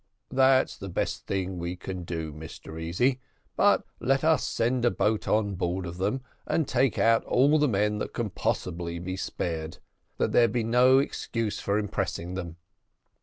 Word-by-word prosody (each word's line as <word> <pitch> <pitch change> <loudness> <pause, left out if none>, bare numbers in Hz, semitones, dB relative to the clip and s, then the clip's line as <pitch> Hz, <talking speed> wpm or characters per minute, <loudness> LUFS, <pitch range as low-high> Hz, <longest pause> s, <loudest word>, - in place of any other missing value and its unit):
"That's 130 0 +4
the 95 - -7
best 85 - -3
thing 95 -2 -2
we 85 +1 -3
can 90 -1 -6
do, 80 -3 -4
Mr 80 +1 -9
Easy; 120 +11 +1 0.4
but - - +4 0.2
let 135 +3 +1
us 160 0 +3
send 120 +2 0
a 120 - +5
boat 110 -2 0
on 105 -2 +1
board 90 0 -2
of 85 +1 -7
them, 105 +8 0 0.3
and 160 - +1
take 130 0 +1
out 115 0 +4
all 145 +5 +4
the 150 - +4
men 105 -2 +1
that - - -4
can 115 -4 -3
possibly 85 -2 -2
be 90 +2 -4
spared, 80 -3 -4 0.4
that - - +1
there 120 - +5
may - - -5
be 120 - +1
no 125 +3 +5
excuse 115 -5 -1
for 100 +1 0
impressing 90 -4 -2
them." 85 -3 -5
105 Hz, 175 wpm, -27 LUFS, 90-125 Hz, 0.4 s, a